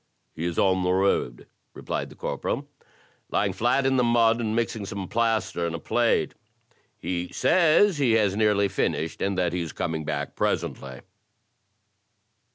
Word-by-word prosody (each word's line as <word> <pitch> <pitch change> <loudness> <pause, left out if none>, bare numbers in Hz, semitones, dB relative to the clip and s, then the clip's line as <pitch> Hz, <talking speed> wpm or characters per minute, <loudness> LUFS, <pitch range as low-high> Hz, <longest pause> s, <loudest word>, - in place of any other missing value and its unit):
"He 80 - -5
is 85 -1 -3
on 95 -1 +3
the 90 0 +1
road," 95 -10 0 0.3
replied - - -4
the - - -14
corporal, - - -3 0.3
" - - -35
l3ring 100 -2 +1
flat 120 +7 +1
in 135 0 +2
the 125 - +3
mud, 115 -1 +3
and 110 -1 -1
mixing 115 -2 -1
some 100 -2 -5
plaster 110 -6 0
in 85 - -4
a - - -5
plate. 120 +6 +1 0.6
He 90 -1 -3
says 175 0 +3
he 125 -5 +3
has 105 -3 +2
nearly 105 -2 +3
finished, 80 -4 -2
and 100 -1 -1
that 90 -2 0
he 90 - -1
is 85 - -5
coming 80 -1 -3
back 75 -2 -4
presently." 65 -2 -2
100 Hz, 165 wpm, -25 LUFS, 85-115 Hz, 0.6 s, on